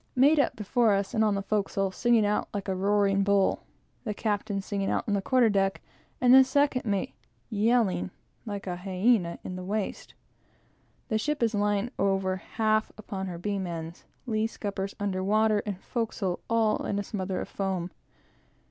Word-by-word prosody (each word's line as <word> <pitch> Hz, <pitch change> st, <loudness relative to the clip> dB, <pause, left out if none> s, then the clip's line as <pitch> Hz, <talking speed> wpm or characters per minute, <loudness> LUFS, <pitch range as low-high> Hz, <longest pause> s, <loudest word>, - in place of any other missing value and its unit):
Mate 285 Hz, +4 st, +5 dB
up 280 Hz, -, +2 dB
before 220 Hz, +1 st, +2 dB
us, 195 Hz, +2 st, -2 dB
and 220 Hz, -2 st, +2 dB
on 210 Hz, -2 st, +2 dB
the 195 Hz, -, -2 dB
forecastle, 195 Hz, -1 st, 0 dB
singing 235 Hz, +1 st, +3 dB
out 210 Hz, +1 st, 0 dB
like 200 Hz, -1 st, -3 dB
a 190 Hz, -, 0 dB
roaring 200 Hz, +1 st, +2 dB
bull; 200 Hz, -1 st, +2 dB, 0.4 s
the 210 Hz, -3 st, -3 dB
captain 205 Hz, -2 st, -1 dB
singing 195 Hz, 0 st, -2 dB
out -, -, 0 dB
on 205 Hz, -, 0 dB
the 200 Hz, -, +1 dB
quarter 250 Hz, +3 st, +3 dB
deck, 195 Hz, -2 st, +1 dB, 0.4 s
and 250 Hz, 0 st, +5 dB
the 265 Hz, 0 st, +10 dB
second 265 Hz, -1 st, +1 dB
mate 205 Hz, +5 st, -1 dB, 0.4 s
yelling, 210 Hz, -, +2 dB, 0.3 s
like 205 Hz, -3 st, -5 dB
a 180 Hz, -2 st, -3 dB
hyena, 185 Hz, 0 st, +1 dB
in 185 Hz, -, -5 dB
the 185 Hz, -, -6 dB
waist. 205 Hz, +2 st, -4 dB, 0.9 s
The 220 Hz, -2 st, +1 dB
ship 300 Hz, +2 st, -1 dB
is 225 Hz, -1 st, +2 dB
lying 205 Hz, +2 st, 0 dB
over 195 Hz, -1 st, +1 dB
half 215 Hz, +2 st, 0 dB
upon 195 Hz, -2 st, -5 dB
her 175 Hz, -2 st, -5 dB
beam 195 Hz, +1 st, -2 dB
ends; 165 Hz, 0 st, -7 dB, 0.2 s
lee 220 Hz, -2 st, 0 dB
scuppers 200 Hz, -3 st, -5 dB
under 190 Hz, -2 st, -1 dB
water, 215 Hz, +1 st, +3 dB
and 200 Hz, -3 st, -3 dB
forecastle 220 Hz, -6 st, -2 dB
all 225 Hz, -2 st, +2 dB
in 200 Hz, -, -1 dB
a 205 Hz, -, -1 dB
smother 190 Hz, -2 st, -3 dB
of -, -, -4 dB
foam. 190 Hz, -3 st, -2 dB
205 Hz, 175 wpm, -28 LUFS, 195-220 Hz, 0.9 s, the